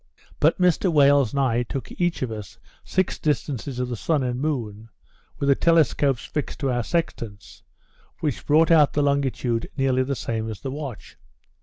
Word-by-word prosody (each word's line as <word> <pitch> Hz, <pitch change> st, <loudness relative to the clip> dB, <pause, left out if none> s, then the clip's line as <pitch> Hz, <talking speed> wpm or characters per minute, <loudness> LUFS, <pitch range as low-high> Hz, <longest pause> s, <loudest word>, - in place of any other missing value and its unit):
But 155 Hz, -, +3 dB
Mr 180 Hz, 0 st, +3 dB
Wales 140 Hz, -5 st, +4 dB
and 140 Hz, -, -2 dB
I 120 Hz, -3 st, +2 dB
took 125 Hz, +2 st, -5 dB
each 175 Hz, -5 st, -1 dB
of 125 Hz, -, -3 dB
us 105 Hz, -3 st, -8 dB, 0.3 s
six 185 Hz, -1 st, -1 dB
distances 145 Hz, -3 st, -2 dB
of 125 Hz, 0 st, -1 dB
the 120 Hz, -, -4 dB
sun 145 Hz, +5 st, 0 dB
and 125 Hz, 0 st, -2 dB
moon, 115 Hz, -7 st, -3 dB, 0.5 s
with 140 Hz, -, -2 dB
the 140 Hz, -, +6 dB
telescopes 145 Hz, -5 st, +2 dB
fixed 150 Hz, -, -4 dB
to 135 Hz, -2 st, +1 dB
our 120 Hz, 0 st, 0 dB
sextants, 115 Hz, -, -4 dB, 0.6 s
which 150 Hz, -5 st, -3 dB
brought 160 Hz, +3 st, +4 dB
out 150 Hz, -3 st, +5 dB
the 145 Hz, -, +1 dB
longitude 135 Hz, -4 st, 0 dB
nearly 130 Hz, -1 st, +2 dB
the 135 Hz, +1 st, -1 dB
same 110 Hz, -2 st, -3 dB
as 110 Hz, -, -7 dB
the 135 Hz, -, -4 dB
watch. 135 Hz, -7 st, -7 dB
135 Hz, 175 wpm, -24 LUFS, 120-150 Hz, 0.6 s, the